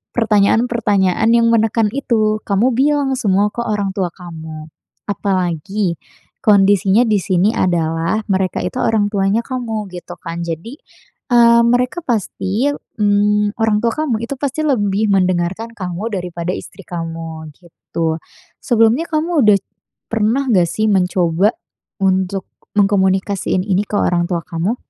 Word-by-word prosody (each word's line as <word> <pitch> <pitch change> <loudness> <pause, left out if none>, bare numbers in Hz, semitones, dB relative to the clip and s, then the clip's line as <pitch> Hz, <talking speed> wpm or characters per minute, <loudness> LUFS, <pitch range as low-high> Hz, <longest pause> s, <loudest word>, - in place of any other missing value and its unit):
pertanyaan-pertanyaan 220 -2 +2
yang 230 0 +4
menekan 225 -1 +2
itu, 215 -5 0
kamu 210 +6 +2
bilang 280 +1 +2
semua 200 0 +2
ke 235 - -4
orang 205 -3 -1
tua 185 -3 -1
kamu. 160 -3 -9 0.4
Apalagi 190 -1 -1 0.4
kondisinya 200 +1 +4
di 210 -2 +2
sini 185 +2 +2
adalah 165 +2 0
mereka 190 -1 0
itu 180 - -3
orang 215 -2 +2
tuanya 200 +2 +1
kamu 230 -5 -3
gitu 175 - -8
kan, 165 0 -6
jadi, 170 - -6 0.5
mmm, 235 -1 +6
mereka 250 +8 0
pasti, 220 +1 -1 0.3
mmm, 205 0 +2
orang 220 -1 +2
tua 230 - +2
kamu 230 -4 -1
itu 255 - -5
pasti 285 +2 -2
lebih 210 -6 +1
mendengarkan 185 +3 0
kamu 185 +2 -4
daripada 175 -2 -3
istri 195 - -10
kamu 165 -2 -6
gitu. 165 -2 -4 0.5
Sebelumnya 235 +6 +3
kamu 310 -2 +1
udah 210 -1 +6 0.5
pernah 225 +5 +1
enggak 185 -6 +4
sih, 215 +4 -1
mencoba 180 +1 +2 0.5
untuk 190 0 0 0.3
mengkomunikasiin 195 -1 +1
ini 195 -1 +1
ke - - -4
orang 175 -3 +1
tua 170 -2 -1
kamu? 175 +7 -2
205 Hz, 130 wpm, -17 LUFS, 180-225 Hz, 0.5 s, mmm